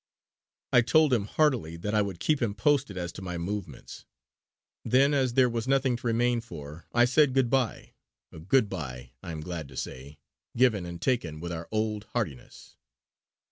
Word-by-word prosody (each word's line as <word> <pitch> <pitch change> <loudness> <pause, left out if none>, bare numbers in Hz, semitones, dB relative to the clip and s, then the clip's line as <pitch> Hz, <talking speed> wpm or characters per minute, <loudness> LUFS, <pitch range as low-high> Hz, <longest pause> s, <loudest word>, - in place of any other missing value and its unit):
I 120 - +7
told 150 +4 +4
him 110 -5 +2
heartily 115 - +1
that 105 +5 -4
I 105 - +4
would 100 -4 -4
keep 150 -3 +1
him 105 -4 0
posted 130 -2 +1
as 85 -1 -3
to - - -10
my 90 -2 -4
movements. 100 +3 -6 0.8
Then, 135 +3 +4
as 130 -4 +1
there 130 -1 +5
was 115 0 -3
nothing 135 -2 +2
to 120 - -5
remain 120 +1 +2
for, 80 -7 -10
I 120 0 +5
said 130 +1 +3
good 130 -3 +2
bye 130 -5 -1 0.4
a 80 - -11
good 105 +8 +2
bye, 65 -10 -6
I - - -7
am 80 -1 -5
glad 80 -2 -5
to 70 - -12
say, 70 +3 -6 0.4
given 110 -8 +3
and 85 0 -7
taken 85 - -1
with 85 +2 -5
our 85 0 -5
old 110 -1 -1
heartiness. 85 - -5
105 Hz, 180 wpm, -28 LUFS, 85-125 Hz, 0.8 s, I